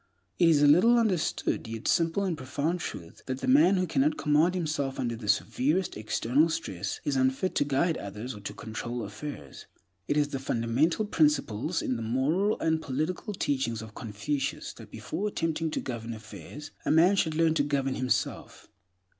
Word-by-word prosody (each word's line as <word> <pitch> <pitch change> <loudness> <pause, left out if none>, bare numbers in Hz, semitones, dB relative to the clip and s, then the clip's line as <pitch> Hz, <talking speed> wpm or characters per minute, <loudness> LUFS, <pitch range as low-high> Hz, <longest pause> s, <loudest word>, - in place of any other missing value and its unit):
It 170 - +6
is 150 -3 +4
a - - +7
little 185 +11 +6
understood, 195 - 0
yet 115 0 -5
simple 165 +4 +2
and 185 -4 0
profound 150 +5 -2
truth, 85 - -7
that 130 -1 -2
the - - -3
man 255 -8 +6
who 185 - +1
cannot 150 -2 +1
command 155 +5 +3
himself 150 -6 -2
under 120 -2 -1
the 110 -2 -8
severest 135 - +1
external 115 +8 +1
stress 100 - -3
is 145 - -1
unfit 130 +7 +1
to - - +2
guide 145 +4 +1
others 105 +6 -6
or 105 - -9
to 100 - -6
control 120 +2 -5
affairs. 105 - -8 0.4
It 145 - +1
is 145 -1 +2
the 135 - -3
fundamental 135 - +1
principle 150 - +1
in 125 - -1
the - - -5
moral 145 - +1
and 160 0 +1
political 160 - -3
teachings 120 -9 -1
of 110 -1 -11
Confucius 135 +7 -3
that, 110 -2 -13
before 155 - -4
attempting 165 -4 -1
to - - -2
govern 115 -2 -5
affairs, 110 +7 -10
a - - -2
man 170 +5 +5
should 160 -5 +1
learn 165 0 +3
to 160 - +2
govern 140 -2 0
himself. 130 -1 -2
145 Hz, 180 wpm, -28 LUFS, 115-165 Hz, 0.4 s, a